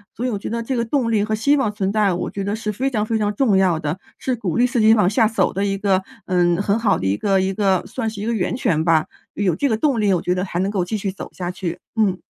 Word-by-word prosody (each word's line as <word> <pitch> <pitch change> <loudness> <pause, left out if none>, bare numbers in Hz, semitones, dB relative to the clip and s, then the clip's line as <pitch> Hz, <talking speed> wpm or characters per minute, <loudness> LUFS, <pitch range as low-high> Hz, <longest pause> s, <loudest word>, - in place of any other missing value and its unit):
所 245 - -3
以 - - +1
我 205 - -3
觉 - - -5
得 230 +1 -2
这 260 +3 -2
个 235 - 0
动 235 -1 0
力 210 -2 +2
和 215 0 -1
希 280 +7 +3
望 270 -7 +1
存 195 -2 -2
在， 210 -2 +2
我 175 - -3
觉 200 - -4
得 200 +2 -1
是 220 -1 -3
非 260 +6 -1
常 215 -5 -1
非 225 - -1
常 205 -1 +1
重 230 -6 +2
要 180 -4 +3
的， 155 +4 -3 0.2
是 255 -2 -2
鼓 230 - -3
励 245 - +4
自 250 -2 0
己 220 +1 +6
往 210 -5 +3
下 215 +3 +3
走 225 +1 0
的 195 - -1
一 195 -1 0
个 195 -1 +1 0.2
嗯， 175 -1 +2
很 200 +2 +1
好 225 -3 +2
的 - - -4
一 95 +1 +2
个 195 - +1
一 190 +1 0
个 195 -2 +1
算 225 -4 -3
是 205 -1 -7
一 - - -3
个 235 - 0
源 215 +2 -1
泉 185 -11 +1
吧。 160 -2 +3 0.3
有 190 -5 +1
这 280 - 0
个 220 - +1
动 250 -2 +1
力， 205 -2 +2
我 180 - +2
觉 180 - 0
得 180 0 -1
还 185 -3 -4
能 195 +2 0
够 195 -3 0
继 210 +5 -3
续 195 -1 -3
走 195 - -8
下 180 -1 -4
去， 180 -2 -4 0.2
嗯。 200 -5 +1
205 Hz, 330 characters per minute, -21 LUFS, 185-225 Hz, 0.3 s, 己